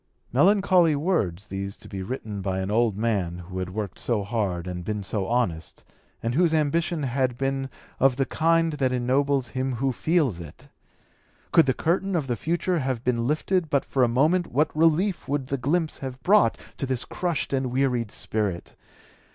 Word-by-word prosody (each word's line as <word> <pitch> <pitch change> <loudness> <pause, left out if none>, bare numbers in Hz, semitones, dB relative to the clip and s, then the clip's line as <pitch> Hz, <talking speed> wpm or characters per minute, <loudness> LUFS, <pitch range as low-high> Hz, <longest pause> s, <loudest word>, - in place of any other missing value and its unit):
Melancholy 180 +1 +4
words 140 - 0
these 100 -1 -5
to - - -13
be 95 -1 -6
written 105 -1 -5
by 95 -1 -2
an 95 +2 -2
old 110 -2 +2
man 100 -6 -1
who 90 +1 -7
had 90 -1 -3
worked 100 -1 -5
so 115 -4 0
hard 100 -5 -2
and 90 -1 -5
been 105 +1 -3
so 95 0 -2
honest, 105 -10 -2 0.4
and 115 +1 -1
whose 165 +2 +3
ambition 160 +1 0
had 130 -1 0
been 135 0 -1 0.3
of 135 -1 +4
the 135 +1 +1
kind 165 +2 +2
that 135 -3 0
ennobles 130 +1 +1
him 130 +3 -2
who 130 +3 0
feels 140 - +1
it! 80 -4 -11 0.8
Could 165 -4 +5
the 130 - +2
curtain 190 +3 0
of 155 -5 0
the 125 -2 -1
future 170 - -1
have 130 -4 -2
been 120 -2 0
lifted 160 +3 0
but 140 -2 +1
for 130 - +1
a - - +5
moment 155 +9 +2
what 150 +4 0
relief 165 +5 +2
would 140 -1 -1
the 140 +1 -2
glimpse 155 +5 0
have 130 -1 -7
brought 200 - +4 0.2
to 135 - -3
his 125 -2 -2
crushed 170 -6 -2
and 135 -1 +1
wearied 125 -4 +1
spirit. 100 -5 -3
130 Hz, 185 wpm, -25 LUFS, 105-155 Hz, 0.8 s, Could